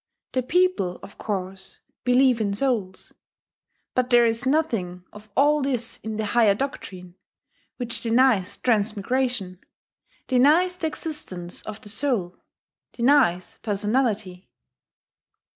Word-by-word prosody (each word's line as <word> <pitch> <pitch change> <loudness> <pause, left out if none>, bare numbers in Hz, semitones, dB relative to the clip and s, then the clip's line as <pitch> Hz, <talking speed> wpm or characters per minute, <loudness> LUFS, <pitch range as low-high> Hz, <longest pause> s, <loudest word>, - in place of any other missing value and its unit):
The 255 - 0
people, 315 - +1
of 200 - -13
course, 190 -2 -5 0.3
believe 250 -1 +4
in 200 -2 0
souls. 210 -7 -2 0.8
But 250 0 0
there 240 -1 +6
is 230 +3 0
nothing 220 - 0
of 210 +1 -13
all 295 +2 +4
this 250 -4 -1
in 220 -1 -5
the 220 - -1
higher 210 -1 +4
doctrine, 185 -8 -6 0.6
which 240 -2 -4
denies 230 -5 +2
transmigration, 220 -2 0 0.7
denies 305 +8 +4
the 325 - -1
existence 190 - -6
of 215 0 -7
the 210 - -11
soul, 215 -7 -1 0.6
denies 235 -9 +2
personality. 210 -3 -1
230 Hz, 110 wpm, -24 LUFS, 195-265 Hz, 0.8 s, there